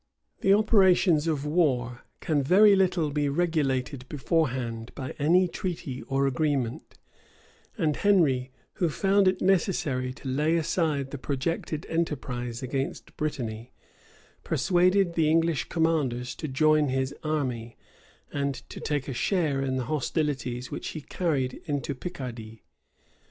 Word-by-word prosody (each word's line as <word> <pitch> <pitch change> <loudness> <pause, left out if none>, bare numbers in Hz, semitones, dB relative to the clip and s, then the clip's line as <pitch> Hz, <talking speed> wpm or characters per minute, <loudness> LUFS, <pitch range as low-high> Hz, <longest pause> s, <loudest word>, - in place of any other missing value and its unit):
The 195 - +2
operations 190 -6 +4
of 150 -3 -1
war 130 -7 0 0.2
can 150 -3 +1
very 200 +8 +6
little 180 -5 +1
be 145 0 0
regulated 140 -5 -1
beforehand 130 -7 -1
by 130 -2 -5
any 175 +5 +4
treaty 170 -9 -5
or 135 +1 +1
agreement; 135 -3 -1 0.8
and 150 -2 +1
Henry, 145 -11 +2 0.3
who 175 - +1
found 195 +4 +2
it 185 0 +1
necessary 160 -9 +1
to 135 - -10
lay 150 +5 +1
aside 155 -4 0
the 140 - -6
projected 150 +3 -3
enterprise 125 -7 -3
against 135 +1 -4
Brittany, 120 -6 -4 0.7
persuaded 185 0 +2
the 160 -2 +2
English 165 -3 +1
commanders 140 -7 0
to 155 - -4
join 155 +2 +3
his 130 +1 -1
army, 130 -7 -2 0.6
and 140 -1 -1
to - - -8
take 145 -3 -2
a 135 - -3
share 145 +1 0
in 130 -1 -1
the 130 - -1
hostilities 135 -4 -2
which - - -5
he 155 - -5
carried 140 -6 -2
into 145 -2 -2
Picardy. 125 - -7
145 Hz, 130 wpm, -27 LUFS, 130-165 Hz, 0.8 s, very